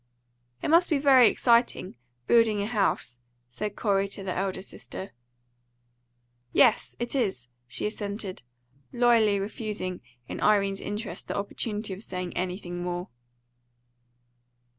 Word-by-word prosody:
"It -, -, 0 dB
must 335 Hz, +3 st, +5 dB
be 310 Hz, -, +3 dB
very 270 Hz, -4 st, +7 dB
exciting, 235 Hz, -5 st, +2 dB, 0.3 s
building 225 Hz, -, +4 dB
a 200 Hz, -, 0 dB
house," 195 Hz, -, 0 dB, 0.3 s
said 205 Hz, +11 st, -4 dB
Corey 200 Hz, -2 st, +1 dB
to 195 Hz, 0 st, -6 dB
the 185 Hz, -1 st, -2 dB
elder 190 Hz, 0 st, -2 dB
sister. 195 Hz, 0 st, -8 dB, 1.4 s
"Yes, -, -, +4 dB
it 240 Hz, 0 st, -3 dB
is," 190 Hz, -, -1 dB, 0.2 s
she 125 Hz, -, -3 dB
assented, 205 Hz, -2 st, -4 dB, 0.5 s
loyally 230 Hz, -4 st, +4 dB
refusing 200 Hz, -3 st, -4 dB, 0.3 s
in -, -, -6 dB
Irene's 200 Hz, -2 st, +3 dB
interest 210 Hz, +2 st, -5 dB
the -, -, -3 dB
opportunity 205 Hz, 0 st, -3 dB
of 190 Hz, -, -8 dB
saying 180 Hz, -4 st, -5 dB
anything 180 Hz, -1 st, -3 dB
more. 175 Hz, 0 st, -3 dB
205 Hz, 120 wpm, -27 LUFS, 185-225 Hz, 1.4 s, very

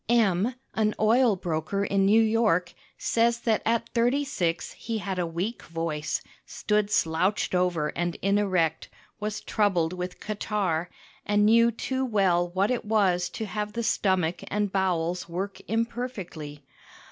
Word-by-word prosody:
M, 225 Hz, 0 st, +3 dB, 0.2 s
an 215 Hz, -1 st, +1 dB
oil 225 Hz, +1 st, +4 dB
broker 175 Hz, +3 st, -2 dB
in 195 Hz, -1 st, +2 dB
New 220 Hz, +3 st, +6 dB
York, 215 Hz, -6 st, +2 dB, 0.2 s
says 235 Hz, +1 st, +1 dB
that 225 Hz, -3 st, +1 dB
at 230 Hz, 0 st, +1 dB
thirty 245 Hz, +4 st, +2 dB
six 170 Hz, -, -1 dB
he 230 Hz, -1 st, -4 dB
had 190 Hz, -2 st, -3 dB
a 175 Hz, -, 0 dB
weak 180 Hz, +8 st, -3 dB
voice, 165 Hz, -2 st, -3 dB, 0.2 s
stood 210 Hz, -1 st, -1 dB
slouched 185 Hz, +2 st, +1 dB
over 180 Hz, -4 st, +1 dB
and 175 Hz, +1 st, -2 dB
inerect, 185 Hz, -5 st, +1 dB, 0.3 s
was 215 Hz, 0 st, -3 dB
troubled 185 Hz, -6 st, +1 dB
with 180 Hz, 0 st, -5 dB
catarrh, 200 Hz, -5 st, -2 dB, 0.3 s
and 205 Hz, 0 st, +2 dB
knew 230 Hz, +2 st, +6 dB
too 260 Hz, +3 st, -2 dB
well 190 Hz, -7 st, +2 dB
what 190 Hz, +5 st, +1 dB
it 250 Hz, -, -1 dB
was 195 Hz, -5 st, +2 dB
to 220 Hz, -, -5 dB
have 210 Hz, 0 st, -4 dB
the 235 Hz, +1 st, -2 dB
stomach 185 Hz, -6 st, +1 dB
and 205 Hz, -1 st, -1 dB
bowels 180 Hz, -2 st, 0 dB
work 190 Hz, +4 st, -4 dB
imperfectly. 220 Hz, -, -4 dB
200 Hz, 145 wpm, -27 LUFS, 175-220 Hz, 0.3 s, New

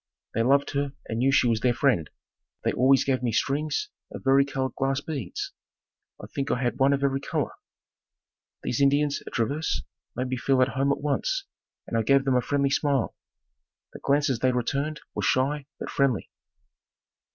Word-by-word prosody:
They 115 Hz, -, +1 dB
loved 140 Hz, +4 st, +3 dB
her 140 Hz, -1 st, -1 dB
and 115 Hz, -, -3 dB
knew 135 Hz, +2 st, +3 dB
she 135 Hz, -, +4 dB
was 115 Hz, -2 st, +2 dB
their 120 Hz, +1 st, +2 dB
friend. 120 Hz, -, +2 dB, 0.5 s
They -, -, +2 dB
always 130 Hz, +2 st, +4 dB
gave 130 Hz, -2 st, 0 dB
me 120 Hz, -2 st, 0 dB
strings 150 Hz, -, 0 dB, 0.2 s
of -, -, -8 dB
vari 135 Hz, +1 st, +5 dB
colored 135 Hz, -1 st, -2 dB
glass 135 Hz, 0 st, 0 dB
beads. 140 Hz, -4 st, -5 dB, 0.7 s
I -, -, -8 dB
think 140 Hz, 0 st, -4 dB
I -, -, +1 dB
had 120 Hz, -2 st, -1 dB
one 135 Hz, +1 st, +5 dB
of 140 Hz, 0 st, +1 dB
every 135 Hz, -1 st, +2 dB
color. 140 Hz, -, -2 dB, 1.1 s
These 125 Hz, -, -1 dB
Indians 145 Hz, +1 st, +3 dB
at -, -, -8 dB
Traverse 140 Hz, +7 st, -1 dB, 0.3 s
made 125 Hz, +1 st, -2 dB
me 130 Hz, -, -1 dB
feel 135 Hz, +2 st, +2 dB
at 130 Hz, -, 0 dB
home 135 Hz, +1 st, +1 dB
at 140 Hz, -, -1 dB
once -, -, -1 dB, 0.4 s
and -, -, -5 dB
I 115 Hz, -, +3 dB
gave 135 Hz, +5 st, +3 dB
them 135 Hz, -2 st, +2 dB
a 125 Hz, -, +4 dB
friendly 140 Hz, +1 st, +1 dB
smile. 140 Hz, -3 st, +1 dB, 0.8 s
The -, -, -9 dB
glances 140 Hz, -3 st, +1 dB
they 130 Hz, +1 st, +3 dB
returned 140 Hz, +5 st, -1 dB
were -, -, -3 dB
shy, 140 Hz, +2 st, +1 dB
but -, -, -5 dB
friendly. 135 Hz, -7 st, +1 dB
135 Hz, 185 wpm, -26 LUFS, 125-140 Hz, 1.1 s, vari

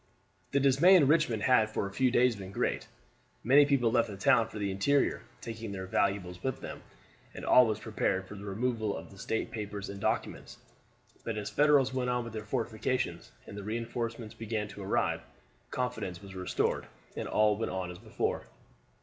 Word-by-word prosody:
The 140 Hz, -, +2 dB
dismay 140 Hz, +8 st, +6 dB
in 165 Hz, -6 st, +6 dB
Richmond 135 Hz, -8 st, +2 dB
had 120 Hz, -4 st, +4 dB
for 110 Hz, -, -2 dB
a 100 Hz, -, -6 dB
few 130 Hz, +4 st, +3 dB
days 125 Hz, -1 st, +3 dB
been 95 Hz, -2 st, -8 dB
great. -, -, -1 dB, 0.6 s
Many 140 Hz, +5 st, +6 dB
people 130 Hz, -5 st, +3 dB
left 115 Hz, -1 st, +2 dB
the 100 Hz, -, -7 dB
town 110 Hz, +4 st, +4 dB
for -, -, -9 dB
the 100 Hz, -2 st, -1 dB
interior, 120 Hz, +10 st, +2 dB, 0.2 s
taking 115 Hz, -2 st, -6 dB
their 95 Hz, -1 st, -5 dB
valuables 95 Hz, -2 st, -1 dB
with 130 Hz, -1 st, -2 dB
them, -, -, -7 dB, 0.5 s
and -, -, -6 dB
all 125 Hz, -2 st, +7 dB
was 110 Hz, -1 st, 0 dB
prepared 95 Hz, -4 st, -1 dB
for -, -, -9 dB
the 100 Hz, 0 st, -9 dB
removal 110 Hz, +1 st, -1 dB
of 80 Hz, 0 st, -10 dB
the 100 Hz, -, -14 dB
state 110 Hz, -, -2 dB
papers 105 Hz, -2 st, -5 dB
and 100 Hz, 0 st, -7 dB
documents. -, -, -2 dB, 0.7 s
But 115 Hz, -2 st, -3 dB
as 105 Hz, -, -4 dB
the -, -, -20 dB
Federals 145 Hz, -3 st, +4 dB
went 125 Hz, -1 st, -1 dB
on 125 Hz, 0 st, 0 dB
with 115 Hz, -1 st, -8 dB
their 110 Hz, -, -4 dB
fortifications, 110 Hz, +4 st, -2 dB, 0.2 s
and -, -, -9 dB
the 100 Hz, -, -5 dB
reinforcements 115 Hz, +1 st, -4 dB
began 110 Hz, -2 st, -3 dB
to 100 Hz, 0 st, -9 dB
arrive, 95 Hz, -, 0 dB, 0.5 s
confidence 125 Hz, -8 st, -3 dB
was 100 Hz, 0 st, -11 dB
restored, 90 Hz, -1 st, -1 dB, 0.3 s
and -, -, -4 dB
all 105 Hz, -1 st, +3 dB
went 115 Hz, +2 st, -3 dB
on 95 Hz, -1 st, -3 dB
as 90 Hz, -, -10 dB
before. 110 Hz, 0 st, -2 dB
110 Hz, 190 wpm, -31 LUFS, 100-125 Hz, 0.7 s, all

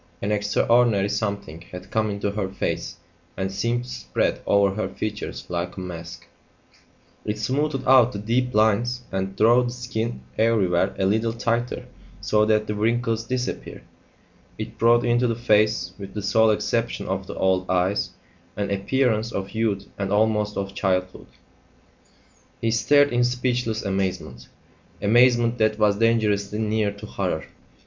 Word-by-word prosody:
An 100 Hz, -, -2 dB
extraordinary 105 Hz, 0 st, +2 dB
something 100 Hz, -6 st, -3 dB
had 90 Hz, +1 st, -9 dB
come 110 Hz, -1 st, +1 dB
into 100 Hz, 0 st, -2 dB
her 100 Hz, -2 st, -3 dB
face 90 Hz, -2 st, -3 dB, 0.4 s
and 95 Hz, 0 st, -2 dB
seemed 115 Hz, +5 st, -1 dB
to 125 Hz, -, -11 dB
spread 120 Hz, -3 st, -1 dB
over 100 Hz, -1 st, +3 dB
her 110 Hz, -, -2 dB
features 105 Hz, -1 st, -5 dB
like 90 Hz, +1 st, -4 dB
a -, -, -4 dB
mask; 85 Hz, -1 st, -8 dB, 1.0 s
it 105 Hz, 0 st, -3 dB
smoothed 135 Hz, +5 st, -1 dB
out 130 Hz, -2 st, +6 dB
the -, -, -5 dB
deep 120 Hz, +5 st, 0 dB
lines 115 Hz, +3 st, +2 dB
and 95 Hz, 0 st, -3 dB
drew 120 Hz, +4 st, +5 dB
the 125 Hz, -, -1 dB
skin 120 Hz, -2 st, -4 dB, 0.2 s
everywhere 100 Hz, -5 st, +2 dB
a 95 Hz, -, +1 dB
little 110 Hz, +3 st, +1 dB
tighter 120 Hz, +1 st, -2 dB, 0.3 s
so 105 Hz, 0 st, +2 dB
that 110 Hz, -1 st, +2 dB
the 105 Hz, -, -3 dB
wrinkles 115 Hz, +1 st, 0 dB
disappeared; 125 Hz, 0 st, -4 dB, 0.7 s
it -, -, -7 dB
brought 120 Hz, +1 st, +4 dB
into 120 Hz, +1 st, +2 dB
the 115 Hz, -, 0 dB
face 110 Hz, -5 st, +2 dB
with 100 Hz, 0 st, -9 dB
the 105 Hz, -, -4 dB
sole 110 Hz, +2 st, +4 dB
exception 110 Hz, -1 st, -1 dB
of 95 Hz, 0 st, -3 dB
the -, -, -7 dB
old 95 Hz, -1 st, +1 dB
eyes 95 Hz, +2 st, +1 dB, 0.5 s
an 100 Hz, -1 st, -2 dB
appearance 115 Hz, +2 st, +1 dB
of 95 Hz, -2 st, -4 dB
youth 110 Hz, -3 st, -1 dB
and 100 Hz, -1 st, -2 dB
almost 105 Hz, 0 st, +1 dB
of 100 Hz, 0 st, -3 dB
childhood. 95 Hz, -2 st, -1 dB, 1.3 s
He 115 Hz, -, 0 dB
stared 145 Hz, +5 st, +4 dB
in 120 Hz, 0 st, +3 dB
speechless 125 Hz, -2 st, -1 dB
amazement 95 Hz, -10 st, -3 dB, 0.5 s
amazement 120 Hz, +2 st, +4 dB
that 110 Hz, -1 st, +2 dB
was 105 Hz, -2 st, +3 dB
dangerously 105 Hz, -2 st, +1 dB
near 110 Hz, -1 st, 0 dB
to 100 Hz, +1 st, -10 dB
horror. 90 Hz, -6 st, -3 dB
105 Hz, 150 wpm, -24 LUFS, 100-115 Hz, 1.3 s, out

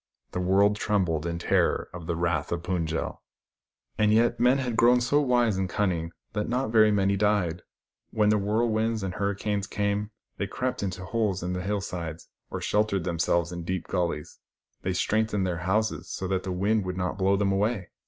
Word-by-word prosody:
The -, -, -3 dB
world 100 Hz, +3 st, +3 dB
trembled 90 Hz, -8 st, 0 dB
in 85 Hz, 0 st, -2 dB
the 85 Hz, -, -8 dB
terror -, -, +2 dB
of 85 Hz, -2 st, -8 dB
the 85 Hz, -, -1 dB
wrath 85 Hz, -3 st, -1 dB
of 85 Hz, -1 st, -2 dB
Fund 90 Hz, -2 st, -1 dB
j 80 Hz, +1 st, -1 dB
el. -, -, -4 dB, 0.8 s
And 105 Hz, 0 st, +4 dB
yet, 115 Hz, +2 st, +3 dB
men 125 Hz, +2 st, +4 dB
had 125 Hz, -4 st, -2 dB
grown 120 Hz, +2 st, +5 dB
so 145 Hz, +5 st, +2 dB
wise 120 Hz, -6 st, +2 dB
and 95 Hz, -1 st, -1 dB
cunning 85 Hz, -4 st, -1 dB, 0.2 s
that 105 Hz, 0 st, -2 dB
not 125 Hz, 0 st, 0 dB
very 110 Hz, -2 st, +6 dB
many 100 Hz, -1 st, +2 dB
died. 100 Hz, -4 st, +1 dB, 0.5 s
"WTien 105 Hz, -1 st, +3 dB
the 105 Hz, -, +3 dB
whirlwinds 110 Hz, +1 st, 0 dB
and 95 Hz, -1 st, -3 dB
hurricanes 100 Hz, 0 st, -1 dB
came, 105 Hz, -1 st, -1 dB, 0.3 s
they 100 Hz, -, -2 dB
crept 125 Hz, +4 st, -2 dB
into 95 Hz, -1 st, -4 dB
holes 105 Hz, -6 st, -1 dB
in 90 Hz, +1 st, -2 dB
the 90 Hz, -, -2 dB
hill 100 Hz, +2 st, -1 dB
sides, 85 Hz, -3 st, -6 dB, 0.2 s
or -, -, -4 dB
sheltered 105 Hz, -3 st, +1 dB
themselves 85 Hz, -1 st, 0 dB
in 85 Hz, -1 st, -5 dB
deep 90 Hz, +1 st, -3 dB
gullies. 85 Hz, -5 st, -2 dB, 0.4 s
They 95 Hz, -, -1 dB
strengthened 105 Hz, +1 st, +1 dB
their 85 Hz, -2 st, -2 dB
houses, 105 Hz, -4 st, 0 dB
so 95 Hz, -, -4 dB
that 95 Hz, -1 st, 0 dB
the 95 Hz, -, -4 dB
wind 100 Hz, +4 st, +1 dB
should 90 Hz, 0 st, -4 dB
not 90 Hz, +1 st, -2 dB
blow 95 Hz, +1 st, +3 dB
them 100 Hz, -1 st, +1 dB
away. 100 Hz, 0 st, 0 dB
100 Hz, 200 wpm, -27 LUFS, 90-110 Hz, 0.8 s, very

